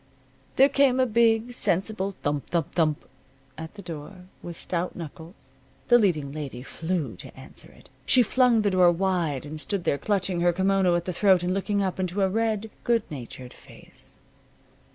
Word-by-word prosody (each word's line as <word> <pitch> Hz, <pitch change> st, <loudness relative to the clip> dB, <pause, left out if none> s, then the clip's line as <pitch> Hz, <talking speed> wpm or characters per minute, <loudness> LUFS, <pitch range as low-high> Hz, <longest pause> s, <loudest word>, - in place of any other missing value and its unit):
There 270 Hz, -, +6 dB
came 275 Hz, -2 st, +3 dB
a 260 Hz, -, +4 dB
big, 230 Hz, 0 st, +2 dB
sensible 195 Hz, -1 st, -1 dB
thump 145 Hz, -1 st, -2 dB
thump 170 Hz, -4 st, -1 dB
thump 155 Hz, -3 st, 0 dB, 0.5 s
at 160 Hz, +4 st, -9 dB
the 200 Hz, -, -10 dB
door, 175 Hz, +3 st, -9 dB, 0.2 s
with 170 Hz, -1 st, -8 dB
stout 180 Hz, 0 st, -3 dB
knuckles. 160 Hz, -4 st, -11 dB, 0.3 s
The 240 Hz, 0 st, +7 dB
leading 155 Hz, -10 st, +1 dB
lady 140 Hz, -4 st, -6 dB
flew 160 Hz, -, -3 dB
to -, -, -12 dB
answer -, -, -11 dB
it. -, -, -19 dB, 0.2 s
She 255 Hz, -2 st, +5 dB
flung 240 Hz, -1 st, +3 dB
the 205 Hz, -, +2 dB
door 180 Hz, -2 st, +5 dB
wide 170 Hz, -6 st, -1 dB
and 155 Hz, +1 st, -7 dB
stood 200 Hz, 0 st, -2 dB
there, 140 Hz, -, 0 dB
clutching 190 Hz, -4 st, -1 dB
her 175 Hz, 0 st, +3 dB
kimono 190 Hz, -1 st, +2 dB
at 170 Hz, 0 st, -1 dB
the 180 Hz, -, -3 dB
throat 190 Hz, -1 st, +3 dB
and 180 Hz, +1 st, 0 dB
looking 200 Hz, +1 st, 0 dB
up 190 Hz, -1 st, -3 dB
into 185 Hz, +2 st, -1 dB
a 190 Hz, -, +2 dB
red, 220 Hz, +1 st, -1 dB
good 235 Hz, -2 st, +2 dB
natured 125 Hz, -2 st, -8 dB
face. -, -, -13 dB
185 Hz, 175 wpm, -25 LUFS, 160-210 Hz, 0.5 s, The